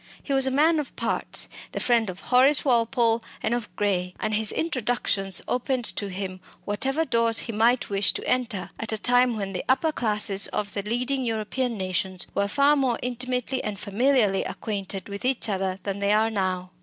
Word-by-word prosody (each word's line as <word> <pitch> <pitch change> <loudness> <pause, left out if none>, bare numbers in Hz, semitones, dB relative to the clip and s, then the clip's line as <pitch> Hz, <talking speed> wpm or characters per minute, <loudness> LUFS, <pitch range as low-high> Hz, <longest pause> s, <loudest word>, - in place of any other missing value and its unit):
He 280 - -2
was 270 -1 +6
a - - +3
man 310 +4 +3
of 295 - -6
parts, - - -1 0.3
the - - -2
friend 230 -4 +2
of 185 +1 -8
Horace 265 +4 +5
Walpole 235 -2 +2 0.2
and 230 - 0
of 240 -3 -3
Gray, 180 -3 -1
and 215 - -1
his 215 0 +2
introductions 240 - 0
opened 250 0 -1
to 205 - -2
him 185 0 -5 0.3
whatever 270 +10 0
doors 230 -4 +1
he - - -4
might 230 +3 +2
wish 200 0 +2
to - - -5
enter, 235 -7 -1
at 225 - -3
a 220 - -1
time 245 +1 +3
when 195 -2 -4
the 180 - -3
upper 310 +5 +3
classes 210 -6 0
of 205 -1 -3
the 200 - -2
leading 250 +6 -1
European 230 +1 -2
nations 185 -1 -2
were 200 - +1
far 280 +7 +3
more 260 -4 +1
intimately 250 +1 -2
and 205 -2 -4
familiarly 215 -2 +2
acquainted 195 -3 -5
with 200 0 -7
each 255 -2 +1
other 190 -2 -1
than 200 0 -3
they 200 +1 +2
are 220 +1 +2
now. 185 -3 -2
225 Hz, 190 wpm, -25 LUFS, 200-255 Hz, 0.3 s, was